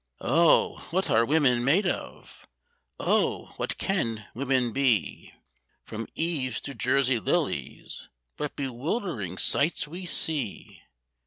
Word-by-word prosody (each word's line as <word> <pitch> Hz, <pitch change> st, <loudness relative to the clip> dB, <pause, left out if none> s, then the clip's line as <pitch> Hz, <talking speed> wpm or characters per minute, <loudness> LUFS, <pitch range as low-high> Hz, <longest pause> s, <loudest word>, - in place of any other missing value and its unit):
Oh! 170 Hz, 0 st, +3 dB
what 190 Hz, +3 st, -1 dB
are 115 Hz, +1 st, +4 dB
women 125 Hz, -3 st, +2 dB
made 165 Hz, +11 st, +3 dB
of? 175 Hz, -, -5 dB, 0.5 s
Oh! -, -, 0 dB
what -, -, -3 dB
can 115 Hz, -, -1 dB
women 130 Hz, -1 st, 0 dB
be? 125 Hz, -, 0 dB, 0.5 s
From 115 Hz, +1 st, -6 dB
Eves 140 Hz, -8 st, -1 dB
to 140 Hz, -, -7 dB
Jersey 130 Hz, -1 st, +1 dB
Lilies 100 Hz, -, -3 dB, 0.3 s
what 150 Hz, -, -4 dB
bewildering 135 Hz, -, -3 dB
sights 145 Hz, -, +2 dB
we 175 Hz, +4 st, -7 dB
see! 155 Hz, -, 0 dB
135 Hz, 110 wpm, -27 LUFS, 120-160 Hz, 0.5 s, are